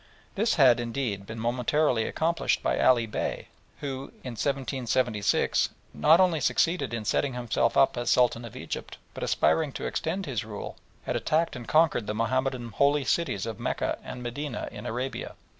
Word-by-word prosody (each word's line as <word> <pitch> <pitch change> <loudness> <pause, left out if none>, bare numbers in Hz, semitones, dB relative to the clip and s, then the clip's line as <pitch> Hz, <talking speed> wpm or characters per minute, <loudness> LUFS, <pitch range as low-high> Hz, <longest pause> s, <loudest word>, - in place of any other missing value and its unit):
This 220 +3 +1
had, 130 -6 +6
indeed, 115 -5 -3
been 110 - -7
momentarily 125 +1 +1
accomplished 165 +1 0
by - - +1
Ali 120 -3 +4
Bey, 105 - -4 0.3
who, 135 -1 -4 0.2
in 125 - -5
1766, 125 -3 0 0.2
not 160 +3 +5
only 180 -4 +4
succeeded 140 +3 +1
in 115 -2 -4
setting 135 +4 0
himself 115 -1 0
up 135 - +5
as 120 0 -1
Sultan 120 -1 +3
of 115 - -9
Egypt, - - -6 0.2
but - - -8
aspiring 155 -3 +2
to - - -5
extend 185 +4 -2
his 130 -8 -2
rule, 105 -1 -7 0.3
had - - -2
attacked 160 0 +1
and 120 -2 -8
conquered 155 -8 +3
the 105 - -2
Mahomedan 125 +2 -1
holy 140 +5 +2
cities 130 - 0
of 115 -3 -5
Mecca - - -2
and 125 - -7
Medina 125 +3 -4
in - - -7
Arabia. 125 +3 -4
125 Hz, 165 wpm, -27 LUFS, 115-145 Hz, 0.3 s, had